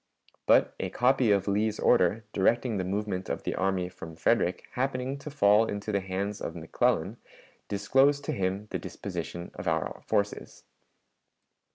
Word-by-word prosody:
But - - +5
a - - -2
copy 125 -2 +3
of 100 -1 +2
Lee's 105 +2 0
order, 110 0 +3
directing 115 +3 +2
the 95 - -1
movement 95 0 -3
of - - -3
the - - -2
army 95 -1 0
from 80 -3 -10
Frederick, 80 - +1
happening 130 +1 -2
to 145 - -7
fall 105 -5 +4
into 105 +1 -4
the 100 - +1
hands 100 +2 -3
of 80 - -4
McClellan, 80 -1 0 0.5
disclosed 135 +8 +2
to - - -1
him 95 +2 -2
the - - -2
disposition 85 0 -6
of 90 - -7
our 80 -1 -1
forces. 100 0 -2
100 Hz, 155 wpm, -28 LUFS, 95-115 Hz, 0.5 s, But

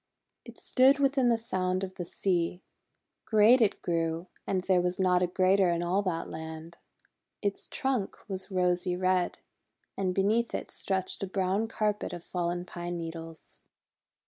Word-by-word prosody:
It - - -12
stood 265 +2 +4
within 270 -3 +3
the 230 - +3
sound 185 -4 -1
of 190 -1 -4
the 175 - -5
sea. 175 0 -1 0.6
Great 220 +3 +6
it 215 - +2
grew, 165 0 -1 0.2
and 185 -2 0
there 185 -1 +3
was 180 0 -1
not 180 -1 +3
a 180 - +3
greater 185 +1 +3
in 170 0 0
all 180 +3 +1
that 175 -4 -2
land. 160 +1 -8 0.7
Its 200 -1 -2
trunk 260 -7 -1
was 190 -1 -4
rosy 180 -1 +1
red, 185 -1 +1 0.6
and 185 -2 -1
beneath 220 +4 +2
it - - -5
stretched 190 -1 -2
a 195 - -2
brown 190 +3 0
carpet 210 -4 -1
of 175 -1 -7
fallen 175 0 -2
pine 175 0 -5
needles. 165 -1 -8
185 Hz, 155 wpm, -29 LUFS, 175-200 Hz, 0.7 s, Great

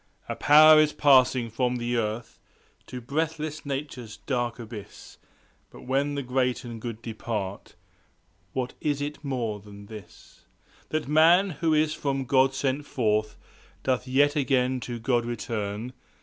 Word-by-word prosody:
A - - -3
Power 155 +1 +7
is 155 -1 +3
passing 130 -4 +4
from 125 +2 0
the 120 0 -2
earth 115 0 -3 0.5
To 125 - -6
breathless 155 +3 -3
Nature's 130 -6 -5
dark 120 +1 -2
abyss; 110 -3 -10 0.5
But - - -14
when 140 +3 0
the 140 - -3
great 125 0 0
and 115 -2 -8
good 115 -1 -6
depart 110 -3 -5 0.8
What 125 -1 -3
is 145 -2 0
it 145 +2 -5
more 120 -7 -2
than 100 0 -13
this– 105 -4 -14 0.4
20 155 0 -1
That 145 - -7
Man, 170 +6 +5
who 160 +1 0
is 155 0 +2
from 135 -3 -2
God 135 +1 +3
sent 135 +2 -1
forth, 110 -4 0 0.5
Doth 130 -1 0
yet 145 +3 +3
again 130 -2 +1
to 120 -1 -5
God 120 +1 +1
return? 115 -1 -4
125 Hz, 150 wpm, -26 LUFS, 115-145 Hz, 0.8 s, Power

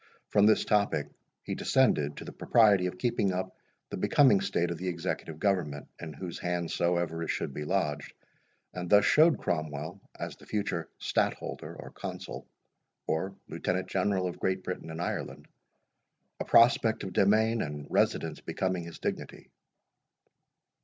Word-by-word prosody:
From 105 0 +5
this 110 - +4
topic 100 -8 +1 0.3
he - - -4
descended 75 - +2
to - - -7
the - - -7
propriety 105 -6 +4
of 90 - -6
keeping 110 -2 +1
up 95 0 -3 0.4
the - - -3
becoming 130 -9 +4
state 90 -3 0
of 85 - -5
the 95 - -4
Executive 85 -2 -3
Government, 80 -7 -1
in 80 -2 -6
whose 85 +3 -7
hands 90 -1 -2
soever 85 -1 0
it 80 - -3
should 70 - -2
be 75 - -5
lodged, 75 -5 -1 0.6
and 90 -1 -5
thus 105 -1 +6
showed 160 +1 +5
Cromwell, 80 +2 -3 0.2
as - - -5
the - - -18
future 95 -6 -2
Stadtholder, - - -2
or - - -10
Consul, - - -7 0.6
or 95 +5 -2
Lieutenant 95 +1 -2
General 95 -1 +1
of 90 - -4
Great 95 0 -1
Britain 90 -3 -5
and 80 +1 -6
Ireland, 85 - -4 0.9
a - - -3
prospect 115 -1 +5
of 95 - -5
demesne 110 +4 +3
and 75 -1 -6
residence - - 0
becoming 95 -2 -2
his 85 - -9
dignity. - - -5
90 Hz, 155 wpm, -29 LUFS, 80-100 Hz, 0.9 s, thus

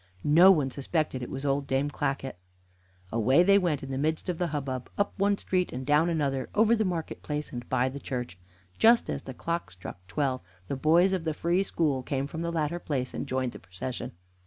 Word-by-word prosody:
No 170 +6 +7
one 150 -8 +4
suspected 140 0 -2
it 125 - -5
was 135 +1 -5
old 140 0 0
Dame 135 +2 0
Clackett. 135 -7 -3 0.7
Away 130 +9 +4
they 200 +2 +6
went 165 -8 0
in 135 - -6
the 130 - -2
midst 155 +5 -1
of 175 - -2
the 175 - +1
hubbub, 135 -5 -4
up 200 - 0
one 200 0 +3
street 180 -2 -1
and 130 +1 -5
down 150 +4 +3
another, 140 -5 -1
over 220 +2 +5
the 220 - +1
market 175 -5 -3
place 150 0 -4
and 120 -3 -7
by 125 - +2
the 135 +2 -5
church. 125 -9 -5 0.4
Just 230 +1 +5
as 140 - -3
the 130 - -8
clock 170 +5 -3
struck 90 0 -9
twelve 130 +3 -1 0.3
the - - -2
boys 170 +7 +4
of 185 -3 -1
the 160 -2 -2
Free 175 +4 +1
School 155 -8 0
came 135 +1 -2
from 160 +3 -6
the 170 0 -2
latter 165 +1 -1
place, 130 -6 -3
and - - -4
joined 130 -2 -1
the - - -10
procession. 120 +8 -6
145 Hz, 215 wpm, -28 LUFS, 130-170 Hz, 0.7 s, No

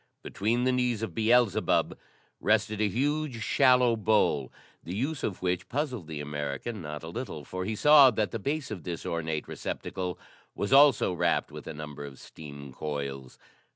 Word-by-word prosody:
Between 115 +5 -1
the 130 - +3
knees 125 -3 0
of 110 - -4
Beelzebub 115 -1 +2 0.4
rested 110 0 +1
a 105 - +3
huge, 140 +1 -1
shallow 125 -2 +4
bowl, 105 - +1 0.3
the 90 - -6
use 135 +6 -2
of 95 -3 -4
which 90 0 -1
puzzled 130 - -3
the 80 -2 -6
American 75 - -4
not 75 -1 -6
a - - -7
little, 85 - -6
for 90 +4 -5
he 110 +2 -2
saw 145 +2 +8
that 110 -3 -1
the 115 - -3
base 145 +4 -3
of 100 -5 -5
this 85 0 -6
ornate 80 -2 -3
receptacle 90 -2 -4 0.4
was 100 - -1
also 140 -9 +6
wrapped 90 - 0
with - - -9
a - - -5
number 75 -1 -7
of 70 -2 -9
steam 70 -3 -10
coils. 70 -3 -5
105 Hz, 170 wpm, -28 LUFS, 75-125 Hz, 0.4 s, saw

